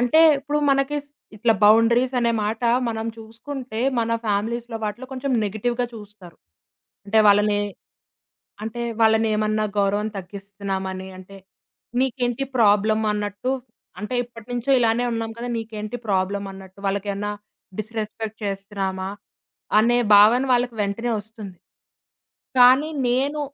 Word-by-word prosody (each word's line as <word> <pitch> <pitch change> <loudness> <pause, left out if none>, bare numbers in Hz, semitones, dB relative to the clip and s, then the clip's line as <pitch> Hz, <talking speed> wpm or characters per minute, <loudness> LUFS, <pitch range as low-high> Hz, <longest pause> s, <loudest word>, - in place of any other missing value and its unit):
అంటే 245 +6 +4 0.2
ఇప్పుడు 295 +2 -2
మనకి 275 +2 +1
స - - -26 0.3
ఇట్లా 225 +2 +3
బౌండరీస్ 235 +4 +5
అనే 235 -1 +2
మాట 220 +3 -3 0.3
మనం 225 -1 -3
చూసుకుంటే 225 +1 -7 0.2
మన 230 0 0
ఫ్యామిలీస్‌లో 225 +3 -1
వాటిలో 215 +5 -4
కొంచెం 265 +1 -2
నెగెటివ్‌గా 240 +4 -1
చూస్తారు. 205 -5 -12 0.7
అంటే 220 +2 +2
వాళ్ళని 205 0 +4 1.0
అంటే 225 +2 -4 0.2
వాళ్ళనేమన్నా 215 -1 +2
గౌరవం 205 +2 +1
తగ్గిస్తున్నామని 190 0 -5
అంటే, 185 +1 -12 0.6
నీకేంటి 255 0 0
ప్రాబ్లమ్ 215 0 +3
అన్నట్టు, 205 +4 -3 0.5
అంటే 210 +4 -4
ఇప్పటినుంచో 240 +2 -3
ఇలానే 230 +1 +2
ఉన్నాం 225 0 -3
కదా! 245 +1 -4
నీకేంటి 220 0 -5
ప్రాబ్లమ్ 200 +1 0
అన్నట్టు 190 0 -13
వాళ్ళకేమన్నా 200 +1 -2 0.5
డిస్‌రెస్పెక్ట్ 220 0 -5
చేస్తున్నామా? 195 -1 -3 0.7
అనే 240 +3 +4 0.2
భావన 220 +5 +6
వాళ్ళకి 245 -1 +1
వెంటనే 205 +4 -2
ఒస్తుంది. 205 -4 -11 1.0
కానీ 260 +5 +6 0.2
నేను 275 +5 0
220 Hz, 110 wpm, -23 LUFS, 205-240 Hz, 1.0 s, భావన